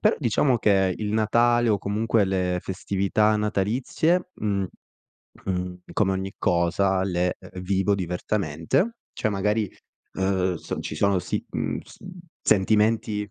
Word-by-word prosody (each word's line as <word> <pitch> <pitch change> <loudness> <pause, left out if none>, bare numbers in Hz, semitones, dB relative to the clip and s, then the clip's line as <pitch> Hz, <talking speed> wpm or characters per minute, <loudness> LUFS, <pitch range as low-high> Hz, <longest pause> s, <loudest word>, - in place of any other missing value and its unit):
però 215 - +3
diciamo 125 0 +2
che 95 -4 +3
il 105 -1 -3
Natale, 120 +2 +3
o 105 -2 +3
comunque 105 +2 +1
le 90 -2 0
festività 100 +3 +1
natalizie, 120 - 0
mhmm, 100 -2 -1 0.8
mhmm, 90 -1 -2 0.2
come 95 -2 +2
ogni 95 +1 -3
cosa 95 +2 +2
le 90 -1 0
e - - -13
e 90 - -7
vivo 95 +2 +1
diversamente. 90 - -1 0.2
Cioè - - -1
magari, 105 +1 0 0.4
ehm, 95 -1 0
s - - -5
ci - - -5
sono 100 +4 +2
si - - -3
mhmm, - - -2
s - - -17
mhmm, 185 -1 -10 0.2
sentimenti 105 0 +2
100 Hz, 140 wpm, -25 LUFS, 95-110 Hz, 0.8 s, però